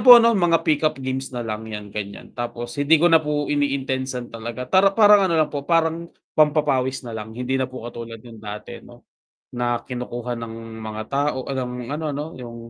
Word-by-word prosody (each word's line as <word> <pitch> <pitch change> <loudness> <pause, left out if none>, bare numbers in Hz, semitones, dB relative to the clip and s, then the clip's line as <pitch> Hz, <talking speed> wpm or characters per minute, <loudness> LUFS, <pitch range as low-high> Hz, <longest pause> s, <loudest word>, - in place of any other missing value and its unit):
po 245 -2 +11
no, 235 0 +6
mga 175 -5 +3
pickup 155 0 +2
games 130 0 -2
nalang 110 -2 -4
yan, 105 -2 -7
ganyan, 100 -1 -6
tapos 120 +2 -5
hindi 145 +3 +6
ko 170 +2 +4
na 160 - +7
po 150 -1 -1
ini-intensan 130 -4 -1
talaga. 115 +2 -5
para 190 +1 +7
parang, 210 -2 +8
ano, 170 - +1
lang 155 -2 +2
po 140 +1 -5
parang 165 0 +2 0.2
pampapawis 145 -4 +2
nalang, 110 -1 -7
hindi 130 +2 -1
na 130 - 0
po 130 -2 -9
katulad 115 -1 -8
ng 115 -3 -12
dati, 105 0 -7
'no, - - -16 0.5
na 120 -1 0
kinukuha 125 -1 -5
ng 115 -1 -6 0.3
mga 110 0 -5
tao 140 -2 -1
ng 130 -2 -2 0.2
ano, 150 +3 -3
'no 145 +1 -3
yung 120 -2 -8
130 Hz, 185 wpm, -23 LUFS, 120-150 Hz, 0.5 s, po